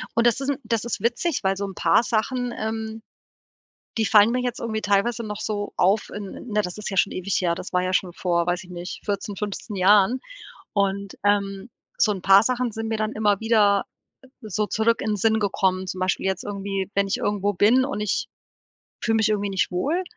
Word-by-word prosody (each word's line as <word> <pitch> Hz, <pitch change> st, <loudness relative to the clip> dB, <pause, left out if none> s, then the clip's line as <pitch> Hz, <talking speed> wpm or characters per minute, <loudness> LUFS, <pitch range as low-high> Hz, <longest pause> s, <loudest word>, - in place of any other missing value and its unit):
Und 235 Hz, +1 st, +4 dB
das 240 Hz, -, +2 dB
ist 275 Hz, -, -2 dB
'n 280 Hz, -, -2 dB
das 230 Hz, 0 st, -1 dB
ist 235 Hz, -, -3 dB
witzig, 250 Hz, +7 st, 0 dB
weil 190 Hz, 0 st, +1 dB
so 200 Hz, -, -2 dB
'n 195 Hz, -, -6 dB
paar 165 Hz, +7 st, +3 dB
Sachen, 245 Hz, +2 st, -1 dB
ähm, 220 Hz, 0 st, -4 dB, 1.0 s
die 220 Hz, -, +2 dB
fallen 210 Hz, +1 st, +6 dB
mir 250 Hz, -, 0 dB
jetzt 245 Hz, -1 st, -2 dB
irgendwie 220 Hz, -2 st, -2 dB
teilweise 210 Hz, +3 st, +1 dB
noch 210 Hz, -1 st, -5 dB
so 205 Hz, -1 st, -3 dB
auf 200 Hz, +4 st, +2 dB
in 205 Hz, +4 st, -8 dB
ne, 210 Hz, 0 st, +2 dB
das 180 Hz, -2 st, -5 dB
ist 210 Hz, 0 st, -5 dB
ja 195 Hz, -, -4 dB
schon -, -, +3 dB
ewig 185 Hz, +1 st, -1 dB
her, 175 Hz, -2 st, +1 dB
das 180 Hz, -, -8 dB
war 180 Hz, -, +2 dB
ja 185 Hz, 0 st, -1 dB
schon 185 Hz, -1 st, 0 dB
vor, 170 Hz, -1 st, 0 dB
weiß 180 Hz, +1 st, -1 dB
ich 180 Hz, -, -15 dB
nicht, 175 Hz, +1 st, -7 dB
14, 200 Hz, -1 st, -3 dB
15 210 Hz, +1 st, -5 dB
Jahren 205 Hz, +6 st, +4 dB, 0.5 s
und, 200 Hz, -1 st, -1 dB
ähm, 200 Hz, +1 st, 0 dB, 0.3 s
so 215 Hz, -, +3 dB
'n 190 Hz, -3 st, -4 dB
paar 195 Hz, +2 st, +7 dB
Sachen 250 Hz, 0 st, 0 dB
sind 225 Hz, +1 st, -4 dB
mir 220 Hz, -, -1 dB
dann 215 Hz, +1 st, -2 dB
immer 210 Hz, -2 st, +1 dB
wieder 210 Hz, -3 st, +3 dB, 0.6 s
so 210 Hz, -1 st, -2 dB
zurück 225 Hz, +2 st, +1 dB
in 215 Hz, -1 st, 0 dB
Sinn 220 Hz, +2 st, +2 dB
gekommen, 190 Hz, -2 st, 0 dB
zum 185 Hz, -, -5 dB
Beispiel 185 Hz, +1 st, 0 dB
jetzt 190 Hz, 0 st, -2 dB
irgendwie, 195 Hz, -1 st, -3 dB
wenn 200 Hz, 0 st, +1 dB
ich 195 Hz, -, 0 dB
irgendwo 205 Hz, -4 st, 0 dB
bin 225 Hz, +8 st, +4 dB
und 275 Hz, -6 st, -3 dB
ich 210 Hz, -2 st, -1 dB, 0.8 s
fühle 225 Hz, -1 st, +2 dB
mich 220 Hz, -1 st, +2 dB
irgendwie 205 Hz, -1 st, 0 dB
nicht 190 Hz, -, 0 dB
wohl, 290 Hz, -, -1 dB
205 Hz, 215 wpm, -24 LUFS, 195-225 Hz, 1.0 s, paar